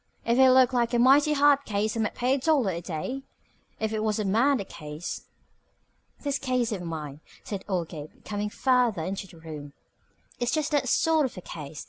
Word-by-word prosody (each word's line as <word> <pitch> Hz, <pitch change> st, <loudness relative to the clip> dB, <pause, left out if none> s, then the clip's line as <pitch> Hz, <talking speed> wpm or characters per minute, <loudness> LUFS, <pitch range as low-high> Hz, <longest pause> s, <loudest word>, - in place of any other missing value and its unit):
"If 235 Hz, +2 st, +2 dB
it 265 Hz, 0 st, +8 dB
looked 255 Hz, 0 st, +5 dB
like 240 Hz, -1 st, +1 dB
a -, -, +4 dB
mighty 275 Hz, +5 st, +5 dB
hard 285 Hz, -1 st, +4 dB
case 215 Hz, -2 st, -1 dB
I -, -, -2 dB
might 215 Hz, -, -1 dB
pay 250 Hz, +2 st, +1 dB
a 275 Hz, -, +1 dB
dollar 270 Hz, -7 st, +2 dB
a 170 Hz, -1 st, -4 dB
day 175 Hz, +11 st, -4 dB, 0.6 s
if 220 Hz, 0 st, -1 dB
it 215 Hz, -, -1 dB
was 215 Hz, -1 st, 0 dB
a 215 Hz, -, -1 dB
murder 235 Hz, +5 st, +2 dB
case." 150 Hz, -2 st, -7 dB, 0.9 s
"This 285 Hz, -1 st, -1 dB
case 255 Hz, -3 st, 0 dB
of 200 Hz, -4 st, -3 dB
mine," 155 Hz, -4 st, -6 dB, 0.2 s
said 200 Hz, -3 st, -5 dB
old 175 Hz, -4 st, -1 dB
Gabe, 155 Hz, -3 st, -8 dB, 0.2 s
coming 210 Hz, 0 st, -3 dB
farther 245 Hz, -6 st, +2 dB
into 195 Hz, +3 st, -4 dB
the 170 Hz, -, -16 dB
room, 150 Hz, -3 st, -9 dB, 0.7 s
"is 240 Hz, -1 st, 0 dB
just 310 Hz, -1 st, 0 dB
that 280 Hz, -4 st, +1 dB
sort 315 Hz, -1 st, +3 dB
of 240 Hz, -, -13 dB
a -, -, -6 dB
case. 150 Hz, -3 st, -8 dB
220 Hz, 200 wpm, -27 LUFS, 175-265 Hz, 0.9 s, it